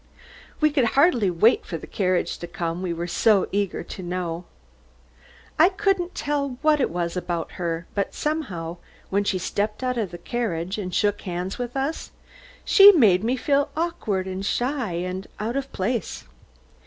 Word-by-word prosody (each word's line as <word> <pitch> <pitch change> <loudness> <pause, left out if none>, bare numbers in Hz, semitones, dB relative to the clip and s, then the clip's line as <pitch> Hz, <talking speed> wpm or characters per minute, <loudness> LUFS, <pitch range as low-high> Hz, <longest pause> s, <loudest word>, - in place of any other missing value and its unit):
We 305 -1 +4
could 275 -4 +2
hardly 265 - +4
wait 180 +7 +3
for 165 - -5
the - - -9
carriage 185 -3 -1
to 175 - -6
come, 170 -1 -3
we 185 -2 -2
were 170 +1 -3
so 195 +3 +3
eager 200 -1 -1
to - - -8
know. 175 -1 -4 1.1
I 335 +4 +7
couldn't 390 -3 0
tell 285 -4 -2
what 305 -2 +4
it - - +2
was 170 0 -2
about 175 -2 -3
her, 170 -1 -3
but 200 - -2
somehow, 185 - -3 0.3
when 200 +1 +2
she 195 -1 0
stepped 210 +5 -2
out 250 -1 0
of 210 -5 -1
the 175 - -8
carriage 190 -3 -3
and 185 -3 -4
shook 205 +2 +1
hands 180 +3 -4
with 245 +1 -4
us, 275 +4 -2 0.6
she 400 0 +9
made 210 - +5
me 240 +3 +1
feel 280 +2 +1
awkward 270 - -1
and 190 0 -4
shy 245 -1 -1
and 185 +3 -4
out 225 +4 -2
of 275 0 -3
place. 220 +5 -2
205 Hz, 170 wpm, -24 LUFS, 180-270 Hz, 1.1 s, she